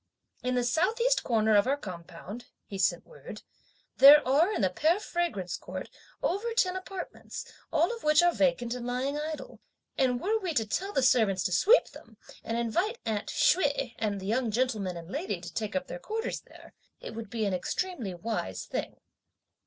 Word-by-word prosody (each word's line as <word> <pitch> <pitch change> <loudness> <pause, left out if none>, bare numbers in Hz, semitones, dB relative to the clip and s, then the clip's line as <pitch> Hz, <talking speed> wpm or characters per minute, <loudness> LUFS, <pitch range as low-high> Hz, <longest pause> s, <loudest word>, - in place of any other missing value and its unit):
In 250 0 -1
the 245 - +2
South 355 - +1
east - - +3
corner 220 -2 +2
of 205 +4 +4
our 280 +2 +2
compound," 185 +1 -9 0.2
(he 195 - -7
sent 185 - +1
word,) - - -11 0.5
"there 285 0 +9
are 305 +9 +4
in - - -1
the 190 -2 +2
Pear 320 - +2
Fragrance 340 - -2
Court, - - -7 0.3
over 455 +6 -1
ten 370 -6 +2
apartments, 375 0 -7 0.3
all 335 +8 +2
of 460 - -12
which 305 +2 +5
are 350 0 +4
vacant 255 -4 +1
and 245 -1 -5
lying 255 +3 -1
idle; 310 +1 -6 0.4
and 250 -2 +2
were 435 - 0
we 360 -6 -3
to 225 -4 +2
tell 380 - -2
the 270 - +1
servants 215 -7 +3
to 185 - -1
sweep 430 - +5
them, - - -15 0.3
and 230 - -2
invite 350 - 0
'aunt' 215 -2 -2
Hsüeh 285 -7 +2
and 205 -2 -1
the 190 - -8
young 230 +4 0
gentleman 215 -6 -1
and 165 -1 -9
lady 280 - -3
to 175 0 -9
take 215 -2 -3
up 185 - 0
their 175 - -7
quarters 445 - -3
there, - - -16 0.3
it - - -8
would 225 -2 -7
be 225 -1 -2
an 200 - 0
extremely 235 - -3
wise 175 - -4
thing." - - -5
250 Hz, 190 wpm, -29 LUFS, 210-345 Hz, 0.5 s, there